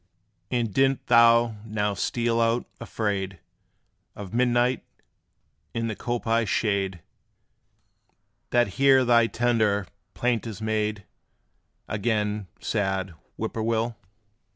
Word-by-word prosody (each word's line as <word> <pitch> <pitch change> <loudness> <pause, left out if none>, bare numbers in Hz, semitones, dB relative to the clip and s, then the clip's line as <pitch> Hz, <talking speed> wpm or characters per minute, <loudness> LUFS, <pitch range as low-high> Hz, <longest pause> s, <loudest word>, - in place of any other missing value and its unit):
And 120 -4 -1
didst 135 0 +2
thou 115 -1 +5
now 105 -2 -1
steal 115 +2 0
out, 115 +1 +1
afraid 100 -5 -3 0.8
Of 100 0 -8
midnight 125 +1 +2 0.9
in 115 0 -1
the 110 - -3
coppice 115 -2 -1
shade, 95 -5 0 1.5
That 120 -2 +3
here 135 -2 +5
thy 115 -1 +5
tender 110 -4 +1 0.3
plaint 120 -2 0
is 105 -3 -7
made 110 -2 -1 0.8
Again, 105 -2 -1
sad 95 -3 -1 0.2
Whip - - -3
poor 110 - -3
will? 115 +1 0
115 Hz, 105 wpm, -25 LUFS, 105-120 Hz, 1.5 s, thou